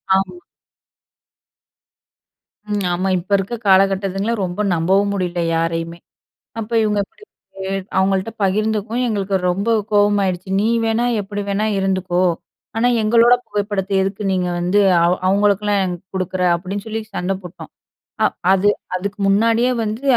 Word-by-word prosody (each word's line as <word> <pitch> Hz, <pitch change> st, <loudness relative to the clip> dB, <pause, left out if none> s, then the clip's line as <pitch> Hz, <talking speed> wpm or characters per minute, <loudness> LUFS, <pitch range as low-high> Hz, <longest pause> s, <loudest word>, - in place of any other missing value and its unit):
ஆமா. 195 Hz, -, -1 dB, 2.4 s
ம். 205 Hz, -1 st, 0 dB
ஆமா, 185 Hz, +2 st, -1 dB
இப்ப 185 Hz, +4 st, -13 dB
இருக்க 195 Hz, +5 st, -3 dB
காலகட்டத்துங்கள 195 Hz, +2 st, +2 dB
ரொம்ப 180 Hz, +4 st, -4 dB
நம்பவும் 195 Hz, +5 st, +2 dB
முடியல 180 Hz, -3 st, -2 dB
யாரையுமே. 165 Hz, +1 st, -2 dB, 0.6 s
அப்ப 220 Hz, +2 st, -7 dB
இவங்க 210 Hz, -1 st, 0 dB
இப்படி 405 Hz, -, -27 dB, 0.3 s
போய் 190 Hz, 0 st, -4 dB, 0.3 s
அவங்கள்ட்ட 190 Hz, +2 st, +1 dB
பகிர்ந்துக்கவும் 215 Hz, +4 st, 0 dB
எங்களுக்கு 200 Hz, -2 st, -1 dB
ரொம்ப 200 Hz, +5 st, -2 dB, 0.2 s
கோவமாயிடுச்சு. 200 Hz, -3 st, +2 dB
"நீ 215 Hz, -, +1 dB, 0.2 s
வேணா 225 Hz, +2 st, +1 dB, 0.2 s
எப்படி 205 Hz, +1 st, -5 dB
வேணா 200 Hz, +2 st, 0 dB
இருந்துக்கோ, 185 Hz, -2 st, 0 dB, 0.6 s
ஆனா 240 Hz, +2 st, +3 dB
எங்களோட 230 Hz, +2 st, +5 dB
புகைப்படத்தை 205 Hz, -1 st, -2 dB
எதுக்கு 195 Hz, +2 st, -3 dB
நீங்க 180 Hz, -1 st, 0 dB
வந்து 185 Hz, +4 st, +2 dB, 0.2 s
அவ 175 Hz, -, +3 dB, 0.2 s
அவங்களுக்கெல்லாம் 205 Hz, +1 st, +2 dB
ஏன் 180 Hz, -1 st, -2 dB, 0.2 s
குடுக்குற?" 185 Hz, 0 st, -2 dB, 0.2 s
அப்படீன்னு 195 Hz, +4 st, -6 dB
சொல்லி 220 Hz, 0 st, -3 dB
சண்ட 185 Hz, +1 st, -1 dB
போட்டோம். 180 Hz, -1 st, -10 dB, 0.5 s
அ -, -, +6 dB, 0.3 s
அது 195 Hz, +2 st, +3 dB, 0.3 s
அதுக்கு 200 Hz, +3 st, -4 dB
முன்னாடியே 230 Hz, +5 st, +3 dB
வந்து, 220 Hz, +4 st, -4 dB
195 Hz, 130 wpm, -19 LUFS, 185-210 Hz, 2.4 s, அ